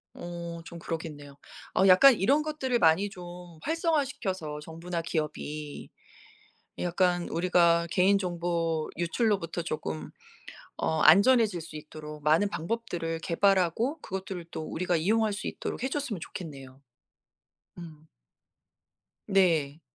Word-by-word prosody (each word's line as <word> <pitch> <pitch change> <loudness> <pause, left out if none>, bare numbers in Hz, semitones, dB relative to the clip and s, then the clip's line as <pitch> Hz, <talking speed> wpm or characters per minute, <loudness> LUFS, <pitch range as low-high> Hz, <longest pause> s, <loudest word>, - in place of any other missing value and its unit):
어 170 -1 -6
좀 170 - -9
그러겠네요. 150 -4 -6 0.4
어 190 - +5
약간 255 +9 +8
이런 265 +9 +2
것들을 285 -5 -1
많이 170 +4 +4
좀 180 -2 -10 0.4
활성화 320 -2 +1
시켜서 185 - -4
정부나 165 +2 -5
기업이 150 -2 -4 0.9
약간 175 0 +1
우리가 170 0 +3
개인 195 +2 +4
정보 170 -3 -1
유출로부터 175 -1 0
쪼끔 80 - -4 0.7
어 160 0 0
안전해질 200 +3 +6
수 160 -1 -9
있도록 150 0 -9
많은 160 +7 +4
방법들을 170 -4 -3
개발하고 195 - +1
그것들을 190 - -6
또 160 - -5
우리가 175 +3 -1
이용할 215 +6 +2
수 205 - -6
있도록 - - -5
해 260 - 0
줬으면 270 -8 -2
좋겠네요. 135 -6 -9 1.0
음. 160 -3 -11 1.2
네. 165 -7 +2
175 Hz, 270 characters per minute, -28 LUFS, 160-200 Hz, 1.2 s, 약간